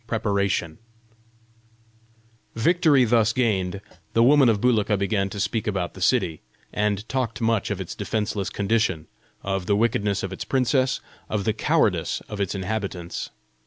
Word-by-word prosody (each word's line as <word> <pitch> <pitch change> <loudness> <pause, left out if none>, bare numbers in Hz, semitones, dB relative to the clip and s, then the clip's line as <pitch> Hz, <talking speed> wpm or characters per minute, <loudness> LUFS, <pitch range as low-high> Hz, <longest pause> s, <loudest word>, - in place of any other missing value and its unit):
PREPARATION 100 -7 -1 1.8
Victory 150 +1 +4
thus 110 -1 +3
gained, 100 -6 0 0.3
the 115 - +4
woman 135 0 +6
of 110 -3 +2
Bulika 110 -3 +2
began 100 0 0
to 100 - -6
speak 110 +3 -1
about 95 -4 -2
the - - -11
city, 80 -2 +1 0.3
and 105 0 -1
talked 125 -5 -2
much 115 -2 +1
of 100 -2 -2
its 95 - -5
defenceless 105 -2 -2
condition, 100 -6 0 0.4
of 95 -2 -2
the 100 - +3
wickedness 105 -3 +1
of 95 0 -4
its 105 - -5
princess, 130 +2 +1 0.3
of 105 -2 -1
the 110 - +1
cowardice 110 - +1
of 105 -1 -4
its 100 0 -1
inhabitants. 95 -3 -4
105 Hz, 145 wpm, -24 LUFS, 100-115 Hz, 1.8 s, woman